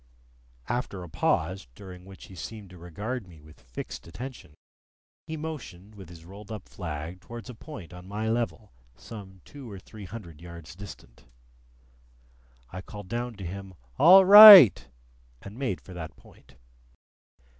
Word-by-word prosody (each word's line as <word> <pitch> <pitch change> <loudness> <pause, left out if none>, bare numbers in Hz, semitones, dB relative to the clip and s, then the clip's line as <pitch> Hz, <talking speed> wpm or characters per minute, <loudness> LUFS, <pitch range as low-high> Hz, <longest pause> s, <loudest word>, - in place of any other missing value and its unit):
After 115 -6 -4
a 90 - -11
pause, 80 0 -2
during 90 0 -12
which 95 0 -14
he - - -15
seemed 100 +1 -10
to 90 - -14
regard 100 +7 -6
me 85 -3 -16
with 75 +1 -19
fixed 60 +5 -9
attention, 105 - -10 0.7
he 160 - -6
motioned 120 - -9
with 95 -5 -13
his 85 -1 -14
rolled 100 +4 -13
up 110 - -8
flag 80 0 -7
towards 115 +2 -10
a - - -12
point 110 - -12
on 90 +1 -12
my 105 +3 -4
level, 115 -2 -3 0.2
some 95 - -12
two 140 -4 -12
or 100 - -9
three 105 +2 -13
hundred 90 -7 -11
yards 85 -2 -12
distant. 90 -12 -13 1.5
I 95 - -7
called 105 -1 -12
down 120 +1 -4
to 95 -2 -9
him, 95 +1 -9 0.2
"All 185 +4 +8
right!" 195 - +10 0.5
and 100 +7 -12
made 125 -10 -3
for 95 - -14
that 80 -3 -9
point. - - -22
95 Hz, 155 wpm, -26 LUFS, 85-115 Hz, 1.5 s, right